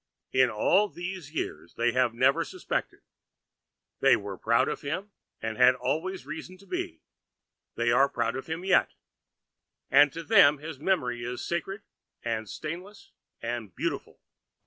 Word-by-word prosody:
In 130 -1 +5
all 190 - +3
these 175 -4 -6
years 160 - -5
they 120 +1 +2
have 125 -1 +2
never 130 +4 +3
suspected. - - -4 1.0
They - - +6
were 100 -1 -5
proud 115 +6 +2
of - - -3
him 185 +8 -4 0.3
and 110 -1 -3
had 125 0 +7
always 175 +6 -2
reason 160 +5 -7
to 200 - -18
be; 355 - -4 0.7
they 120 0 +1
are 135 +3 +5
proud - - -1
of 135 - -6
him 165 +3 -4
yet, 195 - +3 1.0
and 145 +1 +7
to 165 - -6
them 180 -8 +6
his 155 -1 -8
memory 125 -9 0
is 125 +1 -4
sacred 195 +4 -3 0.4
and 110 -3 -2
stainless 175 - -7 0.3
and 115 -4 -4
beautiful.' - - -3
145 Hz, 145 wpm, -28 LUFS, 120-185 Hz, 1.0 s, had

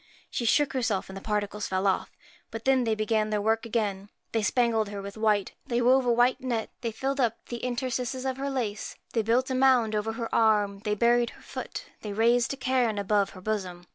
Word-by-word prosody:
She 240 - -2
shook 285 +5 +3
herself, 225 -8 -1
and - - -9
the 195 - -7
particles 210 0 -2
fell 185 +1 -1
off. 195 - +1 0.4
But 225 0 -7
then 265 -2 +3
they 220 -1 +1
began 215 0 0
theirwork 220 +2 0
again: 205 -3 -2 0.2
they 225 - +1
spangled 225 -1 +2
her 205 -1 -5
with 200 0 -7
white, 215 -3 +1 0.2
they 240 -1 0
wove 250 +1 +4
a - - +4
white 245 +2 +3
net, 240 -4 -2
they 230 -2 -2
filled 270 +5 -2
up 235 -3 +2
the 240 - -3
in 250 -1 -1
terstices 255 +1 -2
of 260 0 -2
her 275 +1 -2
lace, 230 -6 -3 0.2
they 230 - +2
built 240 +4 +1
a - - +1
mound 255 -4 +4
over 215 +1 -1
her 230 0 -5
arm, 210 -3 +3
they 210 0 +1
buried 235 +2 +3
her - - -16
foot, - - -6 0.2
they 210 -2 -5
raised 235 +3 +3
a 275 - -4
cairn 250 -4 +1
above 200 0 +1
her - - -10
bosom. 185 -4 -3
225 Hz, 220 wpm, -27 LUFS, 210-245 Hz, 0.4 s, wove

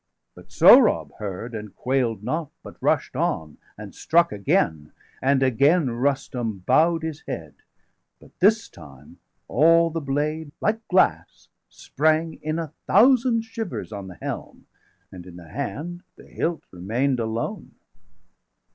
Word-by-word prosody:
°508 - - -53
But - - -16
Sohrab - - +6
heard, 105 +3 -6
and 105 -2 -8
quail'd 125 -5 -1
not, 155 +4 -3
but - - -11
rush'd - - 0
on, 75 -2 -2 0.2
And - - -10
struck 170 +1 +2
again; 80 -7 0 0.3
and 135 0 +2
again 140 +3 +3
Rustum 120 -5 -2
bow'd 165 +1 +3
510 - - -1
His 160 -1 -7
head; 75 -4 -6 0.7
but - - -18
this 215 +4 +3
time 70 +1 -15 0.3
all 165 +3 +4
the 165 0 -3
blade, 145 +2 -2
like 220 +1 -1
glass, 90 - +1 0.2
Sprang 155 +2 -1
in 155 +1 -2
a 160 -3 -5
thousand 235 +2 +4
shivers 225 - -6
on 100 -2 -7
the 90 -2 -11
helm, - - -7 0.5
And 90 -1 -11
in 90 - -12
the 85 -2 -13
hand 155 - -5
the - - -16
hilt 170 0 -3
remain'd 120 +9 -1
alone. 115 0 -4
140 Hz, 140 wpm, -23 LUFS, 105-165 Hz, 0.7 s, Sohrab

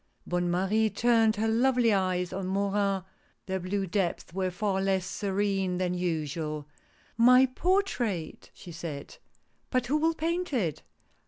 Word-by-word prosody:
Bonne 175 0 -1
Marie 195 +5 +2
turned 225 +1 +3
her 220 +2 0
lovely 240 0 +3
eyes 185 -2 0
on 190 0 -3
Morin; 195 0 0 0.4
their 190 -1 -2
blue 195 +2 -2
depths 185 -3 -2
were 185 0 0
far 190 +1 -1
less 190 -1 +1
serene 195 -1 -1
than 180 -1 0
usual. 155 -3 -3 0.3
" - - -33
My 255 +1 +7
portrait? 255 - -1
" - - -42
she 175 - -11
said. 160 -4 -7 0.3
" - - -43
But 255 -2 +1
who 280 +5 +1
will 325 +2 +1
paint 335 +1 -2
it 170 - -1
195 Hz, 155 wpm, -28 LUFS, 180-225 Hz, 0.4 s, My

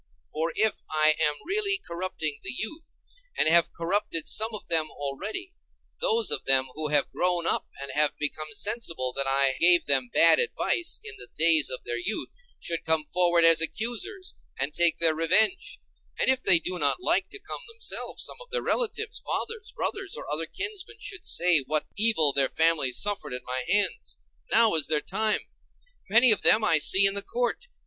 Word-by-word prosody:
For 160 +2 -1
if 220 0 0
I 155 0 +4
am 150 0 +2
really 395 +2 0
corrupting 170 -4 -4
the - - -3
youth, 260 - -7 0.4
and - - +2
have 170 +1 +4
corrupted 170 -1 -2
some 220 +1 +1
of 210 - -11
them 160 -2 0
already, 205 - -6 0.5
those 460 -2 0
of - - -1
them 135 -1 +3
who 155 0 -2
have 145 -1 +1
grown 175 -1 0
up - - -1
and 140 0 -5
have 150 0 +1
become 155 +1 -4
sensible 175 - -2
that 140 0 -2
I 135 -1 +2
gave 175 0 +5
them 130 -3 +1
bad 165 - +5
advice 440 -6 0
in 440 -1 -8
the - - -9
days 160 -2 +4
of 130 - -6
their 120 0 -4
youth 215 - -3 0.3
should 170 -1 -4
come 160 -1 +1
forward 175 +1 +2
as 165 -1 +7
accusers 305 - -3 0.3
and 140 +3 -2
take 170 -1 +3
their 165 -1 +2
revenge; 220 - 0 0.4
and - - +2
if 260 0 -1
they 185 -8 +7
do 180 +2 -4
not - - +1
like - - +1
to 405 - -7
come 405 - -8
themselves, 460 0 -4
some - - -5
of - - -14
their 485 0 -3
relatives, 445 -2 -2
fathers, 450 -1 -5
brothers, 390 -1 -4
or - - -8
other 160 +2 -1
kinsmen, 405 - -6
should 380 -3 -8
say 175 -2 +3
what 150 +3 -2
evil 200 -10 +3
their 135 -1 +2
families 160 -6 +1
suffered 205 -10 -1
at 125 - -4
my 130 0 -3
hands. 205 0 -1 0.3
Now 225 -1 +4
is 160 -3 +1
their 150 -1 0
time. 220 -1 -1 0.7
Many 235 +4 +5
of 215 - +3
them 220 - +5
I 165 -7 +4
see 190 +6 +4
in 195 - +5
the 200 - -1
court. 245 - -3
175 Hz, 185 wpm, -26 LUFS, 155-240 Hz, 0.7 s, as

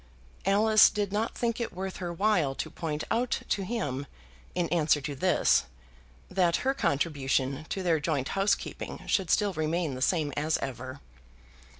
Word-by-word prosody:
Alice 215 +2 +6
did 205 -2 -2
not 215 +2 -1
think 235 -1 -1
it 235 - -3
worth 190 +1 -4
her 175 -2 -4
while 170 -7 +1
to - - -4
point 155 -3 -3
out 245 +1 0
to 200 - +1
him, 145 - -3 0.5
in 175 -1 +1
answer 155 -3 +3
to 145 +1 -4
this, 180 +7 +3 0.6
that 180 -2 +2
her 270 - +3
contribution 140 - 0
to 190 - -3
their 165 -3 +2
joint 145 -3 -1
housekeeping 195 +1 -1
should 190 -5 +1
still 205 -2 +2
remain 160 -1 -1
the 130 - -6
same 150 0 +1
as 155 +2 +1
ever. 130 +1 -6
170 Hz, 160 wpm, -29 LUFS, 145-200 Hz, 0.6 s, Alice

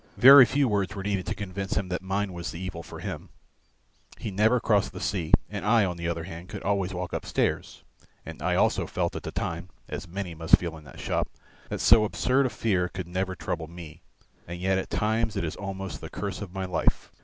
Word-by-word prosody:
Very 130 +4 +10
few 135 +3 +2
words 100 -2 0
were 95 - -5
needed 95 -3 -1
to 105 - -1
convince 100 0 -3
him 100 -3 -1
that 90 - -2
mine 95 +1 -2
was 85 -1 -5
the 85 - -7
evil 90 -3 -5
for 85 - -10
him, - - -6 0.9
he 110 - -5
never 110 +5 +3
crossed 105 -3 +2
the - - -6
sea, 90 -6 -2 0.2
and 100 -3 -5
I 105 0 +4
on 90 -2 -2
the 85 0 -4
other 85 -1 -2
hand 85 0 -9
could - - -7
always 100 -2 0
walk 90 -1 -4
upstairs, - - -1 0.4
and - - -8
I - - +1
also - - +2
felt - - -1
at - - -4
the - - -6
time, 90 - -3 0.2
as 75 +3 -6
many 90 0 -5
must 80 +1 +5
feel 85 -2 -5
in 80 -1 -13
that - - -12
shop, - - -1 0.4
that - - -3
so 110 - +7
absurd 130 +5 +2
a - - -3
fear 100 -5 0
could 95 -2 -5
never 95 +1 -2
trouble 85 -2 -4
me. 85 -1 -10 0.5
And 85 +1 -6
yet 95 +1 +2
at - - -5
times 110 +1 0
it 100 - -1
is 80 - -3
almost 95 -2 -5
the - - -7
curse 100 -1 -4
of 100 -4 -6
my 95 0 -3
life. 90 -2 0
95 Hz, 225 wpm, -27 LUFS, 85-105 Hz, 0.9 s, Very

